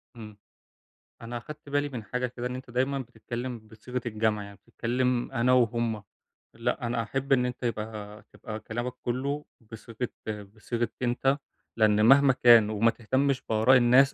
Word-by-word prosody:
إمم. 105 -3 -10 0.8
أنا 120 +1 -5
أخدت 150 +5 -10
بالي 145 0 0
من 125 -5 -6
حاجة 125 +5 -2
كده، 125 0 -5
إن 125 - -5
أنت 130 0 -9
دايمًا 130 +3 0
بتتكلّم 120 0 -6
بصيغة 110 +3 -7
الجمع، 110 -2 0
يعني 100 0 -11
بتتكلّم 125 +4 -1
أنا 125 +2 +2
وهُم 115 -3 +1 0.5
لأ 120 +2 -2
أنا 120 0 0
أحب 135 +5 -1
إن 125 -2 +3
أنت 125 0 -5
يبقى 105 -2 -4
تبقى 110 -2 -7
كلامك 120 +3 -4
كلّه 140 +4 -2 0.3
بصيغة 115 0 -11 0.6
بصيغة 115 +1 -2
أنت، 130 +3 +1 0.4
لإن 105 -1 +4
مهما 135 +2 +7
كان، 120 -4 +6
وما 110 +2 +3
تهتمش 130 +4 0
بآراء 110 +4 +5
الناس 125 +3 +5
120 Hz, 155 wpm, -28 LUFS, 110-130 Hz, 0.8 s, مهما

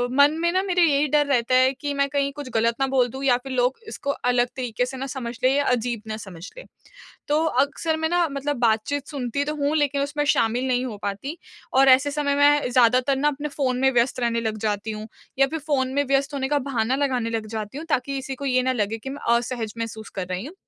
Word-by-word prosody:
मन 285 +2 +6
में 340 - +2
ना 375 - +2
मेरा 360 -2 +2
यही 295 -2 +3
डर 295 0 +4
रहता 255 -2 +2
है 260 +1 +4
कि 290 +1 -4
मैं 280 0 +2
कहीं 280 0 0
कुछ 285 -2 -7
गलत 230 +1 +2
ना 270 - +3
बोल 260 -2 +2
दूँ 265 +3 -7
या 250 -2 +4
फ़िर 260 +1 -8
लोग 250 +1 +1
इसको 280 -9 -3 0.2
अलग 245 0 +2
तरीके 245 -1 -1
से 265 +1 -7
ना 270 +1 -4
समझ 240 -2 -5
लें 255 - +5
या 285 0 +1
अजीब 235 -2 -2
ना 215 0 -4
समझ 185 -4 -9
लें। - - -9 0.6
तो 300 +2 +2 0.2
अक्सर 315 +3 -2
मैं 320 0 -1
ना 345 -1 +2
मतलब 280 0 -2
बातचीत 235 +5 0
सुनती 280 -1 -2
तो - - -4
हूँ 290 +1 0
लेकिन 285 -1 +1
उसमें 290 +1 -1
शामिल 240 +3 +1
नहीं 250 0 +1
हो 220 -5 -6
पाती। 205 - -4 0.4
और 270 +1 +6
ऐसे 265 +2 +5
समय 285 -1 0
मैं 290 -1 +4
ज़्यादातर 250 +2 +4
ना 295 +2 +1
अपने 295 +1 -4
फ़ोन 260 -3 -1
में 265 - +4
व्यस्त 245 +1 +1
रहने 235 -1 0
लग 220 -1 -2
जाती 205 +1 -2
हूँ 215 0 -7 0.3
या 275 - +5
फ़िर 320 +3 -4
फ़ोन 260 -3 0
में 285 +1 +2
व्यस्त 275 +1 +1
होने 265 -1 -2
का 290 0 +2
बहाना 255 -2 -1
लगाने 255 -5 0
लग 225 -1 -3
जाती 215 +3 -5
हूँ, 320 - -7
ताकि 275 -1 0
किसी 270 0 -4
को 280 +2 -7
ये 255 -1 +2
ना 260 - +1
लगे 220 -2 -1
कि 225 +4 -8
मैं 255 -4 0
असहज 235 -2 -4
महसूस 220 -1 -5
कर 180 - -3
रही 185 +5 -4
हूँ 310 - -9
265 Hz, 245 wpm, -24 LUFS, 235-285 Hz, 0.6 s, मन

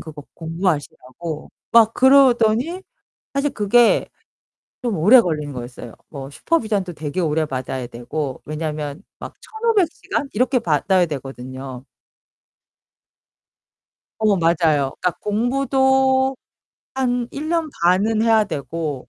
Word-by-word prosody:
그거 155 -3 -10
공부하시라고 160 -2 -4 0.2
막 230 -1 +6
그러더니 265 +4 +4 0.5
사실 280 +1 0
그게 230 +2 +3 0.7
좀 230 -6 -1
오래 225 +10 +7
걸린 150 -7 -3
거였어요. 120 -2 -8 0.2
뭐 135 -2 -8
슈퍼비전도 210 - -1
되게 155 +3 -4
오래 160 -1 +1
받아야 130 -2 -4
되고 130 +3 -5
왜냐면 150 +1 -5 0.2
막 - - -9
1,500 440 -5 0
시간 280 -2 -4
이렇게 255 +3 +2
받아야 175 +2 +2
되거든요. 130 -2 -7 2.4
어 210 -2 +4
맞아요. 160 -5 +2
그러니까 180 - +2
공부도 265 +3 +2 0.6
한 245 -2 0
1 305 +3 -5
년 330 -2 0
반은 205 +5 +3
해야 225 -2 +4
되고 150 - -5
185 Hz, 240 characters per minute, -21 LUFS, 150-245 Hz, 2.4 s, 오래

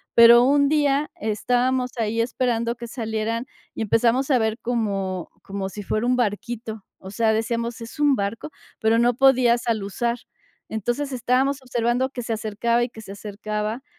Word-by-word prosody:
Pero 235 +1 +9
un 280 +2 +4
día, 290 0 +1
estábamos 250 +4 0
ahí 225 +1 0
esperando 235 0 -1
que 235 0 -8
salieran, 225 0 -3 0.3
y - - -2
empezamos 235 +5 +2
a 260 - +5
ver 220 0 0
como 195 -6 -2
como 195 -1 -4
si 205 - -7
fuera 215 +4 -1
un 250 - +3
barquito, 225 -1 -3
o 190 - -10
sea, 220 +1 +2
decíamos: 230 +1 -2
"¿Es 230 +5 -9
un 290 -2 +4
barco", 205 +5 -3 0.3
pero 220 0 +3
no 240 +1 +3
podías 245 -2 +3
aluzar. 230 +2 -1 0.5
Entonces, 240 +6 -2
estábamos 260 +2 +1
observando 245 +1 0
que 250 -3 -6
se 230 - -2
acercaba, 225 +2 0
y 240 - -2
que 225 - -11
se 205 - -10
acercaba, 210 +3 -4
235 Hz, 165 wpm, -23 LUFS, 220-250 Hz, 0.5 s, Pero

